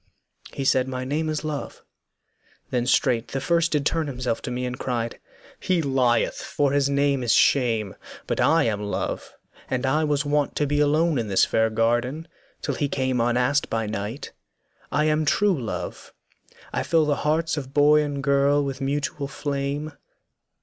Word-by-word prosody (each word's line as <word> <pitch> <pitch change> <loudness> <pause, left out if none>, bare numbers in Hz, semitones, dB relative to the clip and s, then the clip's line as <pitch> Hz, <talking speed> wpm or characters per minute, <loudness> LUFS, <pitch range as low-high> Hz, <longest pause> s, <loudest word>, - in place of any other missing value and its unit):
He 135 - -4
said, 130 -1 +3
'My 130 -1 -4
name 155 +4 -1
is 155 0 -2
Love.' 150 -2 -5 0.9
Then 125 -1 0
straight 125 -3 +2
the 135 - -3
first 170 +3 +1
did 145 -2 0
turn 160 -1 0
himself 125 -4 -2
to - - -5
me 125 +1 -3
And 125 0 -5
cried, 120 -2 -3 0.4
'He 180 -3 0
lieth, 130 -4 +1
for 140 -2 0
his 140 0 +2
name 140 -1 +1
is 120 -2 +2
Shame, 115 -7 +2 0.3
But - - -2
I 165 -1 +4
am 105 -3 -1
Love, 105 0 -4 0.3
and 130 0 -1
I 150 +4 +2
was 150 -1 0
wont 145 0 0
to 150 - +1
be 145 +1 0
Alone 150 0 +2
in 115 - -2
this 95 -2 +3
fair 110 0 +1
garden, 120 +8 0 0.4
till - - -1
he 145 -3 -1
came 130 -3 0
Unasked 125 +4 +1
by 115 -1 -1
night; 105 +5 -5 0.6
I 150 +2 +2
am 155 0 +2
true 195 +6 +2
Love, 110 - -6 0.6
I - - 0
fill 165 -2 +2
The 145 -1 +1
hearts 160 +2 0
of 135 -3 -6
boy 150 +1 +5
and 145 -2 -3
girl 140 +1 +3
with 135 0 -5
mutual 140 +1 -2
flame.' 140 +2 -3
140 Hz, 175 wpm, -24 LUFS, 125-150 Hz, 0.9 s, boy